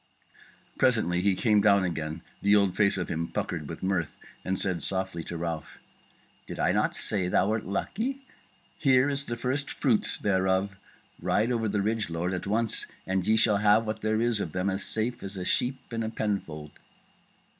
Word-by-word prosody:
Presently 110 -9 +2
he 100 0 +2
came 105 0 +3
down 100 -1 +5
again 80 -2 -3 0.2
the 100 +1 +4
old 100 -3 +3
face 100 0 +3
of 90 - -2
him 85 +1 -2
puckered 75 -4 -4
with 80 - -7
mirth, 95 -5 -1 0.3
and 95 0 -1
said 90 -4 -1
softly 95 -3 -2
to 85 - -5
Ralph: 80 -2 -4 0.7
"Did - - -7
I - - +3
not - - +1
say 95 -4 -1
thou 95 +2 +2
wert 110 0 -1
lucky? 245 - -3 0.5
here 130 0 +4
is 140 0 -2
the 120 - -4
first 130 +4 -1
fruits 125 -7 +1
thereof. 95 0 +1 0.5
Ride 110 +4 +1
over 115 -3 0
the 100 -1 0
ridge, 110 -1 -1
lord, 85 +2 -2
at 95 - -4
once, 110 +2 +1 0.2
and 95 -1 -1
ye 110 +1 +4
shall 110 -2 +4
have 105 +2 +4
what 110 0 -3
there 110 0 +1
is 115 -2 +1
of 80 - -4
them 95 +2 0
as 95 +1 -3
safe 120 +2 -1
as 95 0 -6
a 90 - -4
sheep 130 0 -1
in 115 - -1
a 110 - -2
penfold." 85 -10 -3
100 Hz, 190 wpm, -28 LUFS, 90-115 Hz, 0.7 s, down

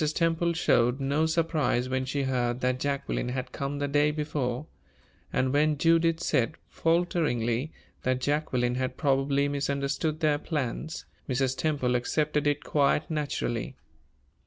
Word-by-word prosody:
Temple 165 0 +1
showed 125 -5 +2
no 140 +4 +1
surprise 160 -6 +1
when 130 0 -1
she 140 +2 -1
heard 125 -2 0
that 125 0 +1
Jacqueline 140 -3 -2
had 130 0 -4
come 140 0 -3
the 145 0 -1
day 145 +1 +3
before; 150 -3 -2 0.7
and 130 +1 +1
when 150 +1 +3
Judith 165 +1 +3
said, 130 +6 +1
falteringly, 155 -7 0 0.3
that 130 0 0
Jacqueline 130 -4 0
had 130 - -2
probably 140 0 +2
misunderstood 140 +2 -1
their 150 -3 +2
plans, 150 0 -3 0.2
Mrs. 130 0 +1
Temple 140 -5 0
accepted 150 +4 0
it 145 0 +1
quite 150 +2 +1
naturally. 145 -6 -2
140 Hz, 135 wpm, -28 LUFS, 130-155 Hz, 0.7 s, day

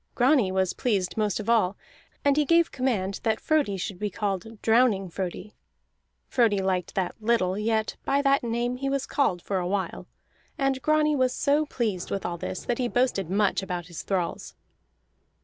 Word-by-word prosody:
Grani 250 -6 +3
was 190 -1 +1
pleased 195 -7 -1
most 210 -3 0
of 215 - -6
all, 215 -5 +2 0.5
and 285 -1 +4
he 300 - +3
gave 335 +3 +3
command 210 -7 -1
that 220 -1 0
Frodi 290 -11 +1
should 185 0 -5
be 210 - -1
called 205 +2 -4
Drowning 225 -5 +3
Frodi. 190 +3 -5 0.7
Frodi 230 -5 +2
liked 185 -2 -1
that 185 -2 -1
little, 215 -5 +2
yet 220 +1 -1
by 275 - +1
that 275 0 +3
name 240 +1 -1
he 275 +1 -2
was 275 -1 -1
called 185 - 0
for 195 -2 -1
a 175 - -2
while. 195 0 -3 0.5
And 270 -1 0
Grani 305 0 +3
was 255 -2 +1
so 295 +2 +2
pleased 215 -10 -2
with 195 - -3
all 175 -1 -3
this 185 - -5
that 240 - -1
he 250 - +1
boasted 240 -8 0
much 200 +1 +2
about 180 -2 -4
his 170 -1 -7
thralls. 185 -3 -3
215 Hz, 180 wpm, -26 LUFS, 190-255 Hz, 0.7 s, and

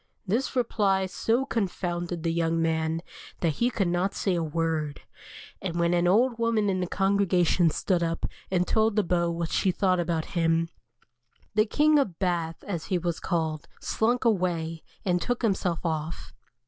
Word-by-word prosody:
This 230 +8 -1
reply 200 -6 +2
so 230 +7 0
confounded 175 - -2
the 165 -1 0
young 165 0 +1
man 160 0 0 0.4
that 160 -4 0
he 240 - +4
could 200 -6 0
not 175 +3 0
say 195 - 0
a 170 - 0
word, 160 -2 -2 0.6
and 175 -2 -3
when 170 0 +2
an 175 0 +2
old 230 +5 +3
woman 225 -3 +2
in 185 - -1
the 180 - -1
congregation 185 -3 +2
stood 175 +3 0
up 165 0 -1 0.2
and 180 -1 +1
told 220 -1 +2
the 210 - +3
Beau 170 -1 +1
what 170 -1 -3
she 195 - +2
thought 185 0 +2
about 170 -2 -1
him, 165 -1 +2 0.8
the 215 +1 +3
"King 300 +5 +4
of 195 -12 -1
Bath," 170 -3 -1
as 175 -6 -4
he 185 - 0
was 170 -1 -2
called, 160 -4 -2
slunk 240 +3 0
away, 170 -6 0 0.2
and 180 -2 +1
took 245 +6 -2
himself 185 -6 0
off. 160 0 -3
175 Hz, 170 wpm, -27 LUFS, 165-200 Hz, 0.8 s, he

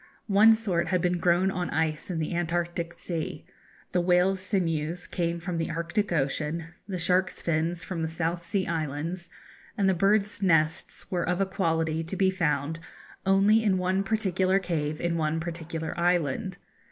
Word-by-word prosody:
One 215 +2 +6
sort 185 -6 0
had 185 - +2
been 180 0 +1
grown 175 +3 +3
on 180 -2 -2
ice 155 +1 -1
in 175 - -2
the 160 +2 -2
Antarctic 170 0 -1
Sea, 170 -2 -5 0.5
the 180 - +2
whale's 180 +2 +3
sinews 170 -3 -1
came 170 -1 -2
from 175 -1 -3
the 165 - -1
Arctic 170 +5 -1
Ocean, 155 +2 -1 0.2
the 190 -3 -3
shark's 180 +2 +1
fins 170 +1 -1
from 180 -3 -4
the 160 - 0
South 165 +1 -2
Sea 190 +2 -1
Islands, 165 +2 -3 0.5
and 200 -2 +2
the 190 - +4
birds' 200 +3 +2
nests 160 0 +1
were 180 -2 0
of 180 +1 0
a 195 - +3
quality 165 -4 0
to 165 +4 -5
be 190 0 +3
found 160 -3 -1 0.5
only 200 +3 +5
in 200 -3 +3
one 185 +2 +1
particular 190 -3 +1
cave 155 -5 -2
in 170 -1 0
one 160 0 0
particular 165 -1 -4
island. 175 +2 +1
175 Hz, 165 wpm, -27 LUFS, 165-190 Hz, 0.5 s, One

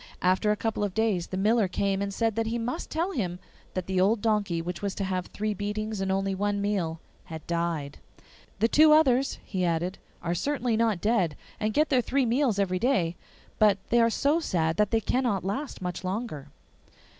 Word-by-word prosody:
After 185 +4 +3
a - - +2
couple 225 -1 -1
of 200 -3 -2
days 215 -6 +1
the 185 - -4
miller 215 +1 +3
came 195 +2 -1
and 200 0 -2
said 225 +2 0
that 225 0 0
he 230 +1 -1
must 245 +8 -3
tell 335 +5 -1
him 180 - -2 0.4
that 185 -2 -2
the 190 -1 0
old 210 +4 +3
donkey 205 -6 0
which 170 +1 -5
was 200 -1 -2
to 200 - -2
have 185 -1 -2
three 215 0 -2
beatings 210 +1 -3
and 190 0 0
only 195 0 0
one 205 +1 -1
meal 190 -6 -1 0.3
had 160 -1 -8
died. 170 -4 -2 0.6
'The 220 +4 +3
two 305 +3 +6
others,' 270 -4 +3
he 185 -3 -2
added, 175 +2 -1 0.2
'are 170 0 0
certainly 245 - 0
not 220 -5 +1
dead, 205 -9 +1 0.2
and 215 0 0
get 305 0 +3
their 255 - +3
three 265 +2 +1
meals 240 -2 +1
every 185 -2 0
day, 185 -9 +1 0.4
but 210 -3 +5
they 240 0 +5
are 230 - +4
so 285 +7 +2
sad 165 - 0
that 210 -1 +3
they 225 -1 +1
cannot 240 -4 0
last 210 +2 -4
much 180 0 -4
longer. 185 - -4
205 Hz, 200 wpm, -27 LUFS, 185-230 Hz, 0.6 s, two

